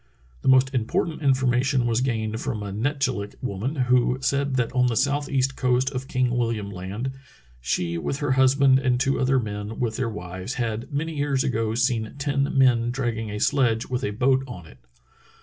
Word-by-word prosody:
The - - -5
most 130 +1 +5
important 130 +7 -1
in 135 -3 +4
formation 130 0 +1
was 120 0 +1
gained 110 -3 -2
from 120 -6 -3
a 100 - -5
Netchillik 120 -3 -2
woman 125 +4 -3
who 125 -1 +2
said 140 0 0
that 125 -2 0
on 125 -1 +3
the 120 - 0
southeast 140 0 0
coast 125 +1 +1
of 130 -1 -5
King 125 -2 0
William 115 -4 -1
Land 100 +7 -5 0.5
"she 85 +7 -1
with 135 - -2
her 145 -2 -1
husband, 130 0 +4
and 125 -2 +1
two 135 +1 +1
other 130 +1 +2
men 105 -1 -5
with 115 -3 -1
their 125 -2 -1
wives, 95 +1 -6
had 115 0 -3
many 155 +3 -2
years 140 -2 0
ago 115 -3 -1
seen 120 -2 0
ten 140 -1 -1
men 120 -3 +4
dragging 120 -3 -2
a 105 0 -4
sledge 120 -2 +2
with 125 -1 -2
a - - 0
boat 130 +5 +2
on 90 -10 -9
it. 65 -4 -16
125 Hz, 185 wpm, -24 LUFS, 110-135 Hz, 0.5 s, most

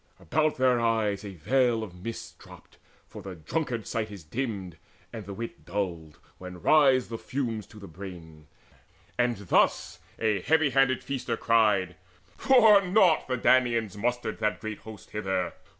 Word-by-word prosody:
About 155 +2 0
their 130 -2 +3
eyes 110 -4 0
a 100 -2 -8
veil 120 - +1
Of 100 -5 -8
mist 115 +1 -7
dropped, - - -16 0.3
for - - -10
the 95 -1 -8
drunkard's 120 - -3
sight 110 -1 -2
is 100 -5 -10
dimmed, 95 - -4 0.4
And 110 -4 -8
the 100 - -6
wit 115 +2 -7
dulled, 85 -5 -4 0.2
when 90 -1 -9
rise 135 - +4
the 115 -1 -5
fumes 115 -6 -4
to 110 - -16
the 100 -2 -10
brain: 80 -4 -11 0.7
And 120 -1 +2
thus 100 -3 +1 0.2
a 105 -4 0
heavy 160 - +2
headed 130 -1 +2
feaster 125 -4 -3
cried: 105 -6 +2 0.4
"For 225 -6 +6
naught 185 -3 +3
the 130 -1 -1
Danaans 120 -5 +2
mustered 120 +1 -2
that 105 -1 -1
great 110 -2 -6
host 110 -2 -12
Hither! 95 -3 -2
110 Hz, 155 wpm, -27 LUFS, 95-130 Hz, 0.7 s, For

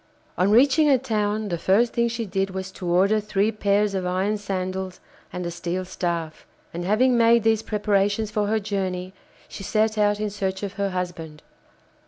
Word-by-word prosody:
On 185 +2 +2
reaching 275 +7 +5
a 270 - +5
town, 215 -4 -1
the 170 -2 -2
first 220 +7 +2
thing 235 0 +2
she 230 0 -3
did 195 0 -1
was 190 0 -5
to 185 -1 -7
order 195 +5 +3
three 210 0 0
pairs 205 -1 +1
of 190 -1 -2
iron 185 +4 0
sandals 190 -1 -4 0.3
and 180 0 -5
a 170 - -3
steel 175 +2 -3
staff, 170 -3 -4 0.3
and 175 +1 -4
having 235 +7 +3
made 230 -1 +4
these 220 -1 +3
preparations 205 0 0
for 210 -1 0
her 220 +1 +1
journey, 190 -3 -3 0.3
she - - -9
set 215 +2 0
out 205 0 +2
in 210 -1 -2
search 190 -1 -3
of 200 -1 -4
her 200 0 -1
husband. 175 -4 -5
200 Hz, 185 wpm, -24 LUFS, 185-215 Hz, 0.3 s, reaching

